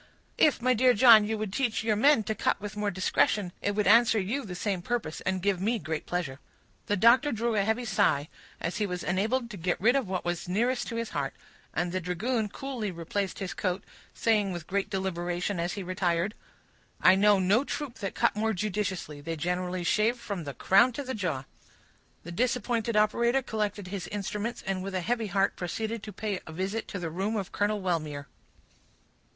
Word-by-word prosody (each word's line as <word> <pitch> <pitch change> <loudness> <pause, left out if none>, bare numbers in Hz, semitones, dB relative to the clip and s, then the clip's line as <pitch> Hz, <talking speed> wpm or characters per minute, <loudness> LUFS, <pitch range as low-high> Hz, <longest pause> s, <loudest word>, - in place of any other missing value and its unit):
"If, 295 -6 +4
my 255 0 +4
dear 250 +1 +4
John, 220 -1 +8
you 220 0 -1
would 210 -3 -4
teach 240 -4 0
your 220 -1 +2
men 255 +2 +5
to 220 - -1
cut 210 - 0
with 205 0 -6
more 210 0 0
discretion, 190 0 +1
it 205 0 -1
would 210 -1 +1
answer 225 +2 +6
you 230 +9 -2
the 180 -5 -7
same 190 0 -2
purpose—and 185 -3 -2
give 195 -3 +1
me 230 +4 +1
great 160 -4 -4
pleasure." 155 -7 -3 0.5
The 205 - +1
doctor 245 +8 +5
drew 230 +1 0
a 210 - +2
heavy 220 +4 0
sigh, 155 -9 +2 0.3
as 170 - -3
he 210 -1 0
was 180 -1 -4
enabled 225 +7 0
to 205 - -7
get 175 +1 -1
rid 240 +6 +4
of 270 -6 +1
what 185 -2 -2
was 175 0 -3
nearest 240 +7 0
to 230 - -5
the 230 0 -1
heart; 140 -2 -2 0.4
and 175 +2 -1
the 185 - -1
dragoon 210 +6 -1
coolly 250 -2 -4
replaced 185 +3 -3
his 195 -1 -4
coat, 185 -1 -2 0.3
saying 210 -4 +1
with 175 -3 -5
great 200 +2 -1
deliberation 180 -1 -2
as 175 +1 -1
he 200 - -5
retired,— 180 +1 0 0.7
"I 185 - +7
know 205 +1 +5
no 195 +7 +3
troop 285 -3 -5
that 195 -3 -4
cut - - +2
more 220 +1 0
judiciously; 190 -6 -3
they 165 +3 -4
generally 180 +2 -2
shave 215 +7 +2
from 200 -8 -5
the 140 -2 -6
crown 235 - +4
to 285 - -4
the 260 0 -4
jaw." 165 - -2 0.8
The 170 - -8
disappointed 235 +2 0
operator 235 +5 +3
collected 210 -4 -3
his 195 -2 -5
instruments, 210 +3 -4
and 190 -1 -1
with 195 0 -5
a 185 - 0
heavy 230 +3 -1
heart 195 0 +1
proceeded 220 +5 -3
to 210 - -8
pay 205 -2 -3
a - - -7
visit 190 +7 -3
to - - -5
the 170 -3 -4
room 195 +6 -1
of 195 -3 -3
Colonel 205 +1 0
Wellmere. 155 -6 -2
200 Hz, 200 wpm, -28 LUFS, 180-225 Hz, 0.8 s, John